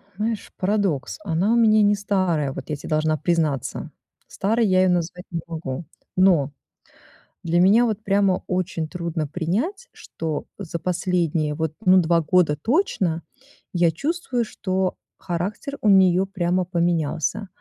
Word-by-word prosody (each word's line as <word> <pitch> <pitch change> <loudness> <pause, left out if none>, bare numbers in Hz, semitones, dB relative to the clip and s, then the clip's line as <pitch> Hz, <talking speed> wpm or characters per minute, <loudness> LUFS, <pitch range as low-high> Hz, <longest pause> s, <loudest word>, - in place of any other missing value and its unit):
Знаешь, 220 +1 -3
парадокс: 195 -8 -1
она 190 +5 +1
у - - +3
меня 215 -2 +5
не 205 0 +4
старая, 185 -8 0
вот 135 - -8
я 150 - -1
те - - -10
должна 155 0 +1
признаться. 155 -4 -1 0.4
Старой 225 +4 0
я 185 0 +4
её 185 - +4
назвать 180 0 -1
не 165 -2 -2
могу. 160 -2 -5 0.3
Но 175 -7 +4 0.9
для 170 +1 +1
меня 215 +6 +5
вот 215 -1 -2
прямо 195 -1 +2
очень 180 -3 -2
трудно 170 -3 -3
принять, 225 - -2
что 160 -2 -5
за 170 -4 -5
последние 170 -4 0
вот, 160 -1 -2
ну, 185 +1 +7
2 170 0 +2
года 160 -2 +2
точно 200 - 0 0.5
я 170 -2 +3
чувствую, 275 - -2
что 185 -2 -2 0.2
характер 190 +10 -4
у 215 - +3
неё 190 -1 +5
прямо 180 -1 0
поменялся. 170 +2 -1
180 Hz, 145 wpm, -23 LUFS, 165-200 Hz, 0.9 s, ну